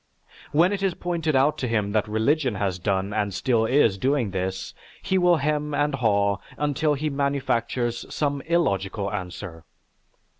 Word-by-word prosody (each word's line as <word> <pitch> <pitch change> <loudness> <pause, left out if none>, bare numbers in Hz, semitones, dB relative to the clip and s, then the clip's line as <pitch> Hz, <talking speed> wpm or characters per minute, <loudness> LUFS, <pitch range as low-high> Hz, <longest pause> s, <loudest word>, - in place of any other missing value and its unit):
When 170 +6 +4
it 200 - -3
is 195 -2 0
pointed 165 -4 -1
out 135 +3 +3
to 125 - -1
him 105 -3 0
that 105 0 +1
religion 125 +4 +1
has 95 -2 -1
done 95 +1 -1
and 105 -1 0
still 110 +4 +1
is 115 -7 +3
doing 130 -3 +1
this, 95 0 -3 0.3
he 190 - 0
will 180 -1 +5
hem 150 0 -1
and 145 0 +1
haw 100 -5 +2 0.2
until 150 +1 +1
he 150 +2 -2
manufactures 130 -4 -1
some 145 -2 -1
illogical 100 - 0
answer. 90 -3 -6
125 Hz, 155 wpm, -24 LUFS, 100-150 Hz, 0.3 s, will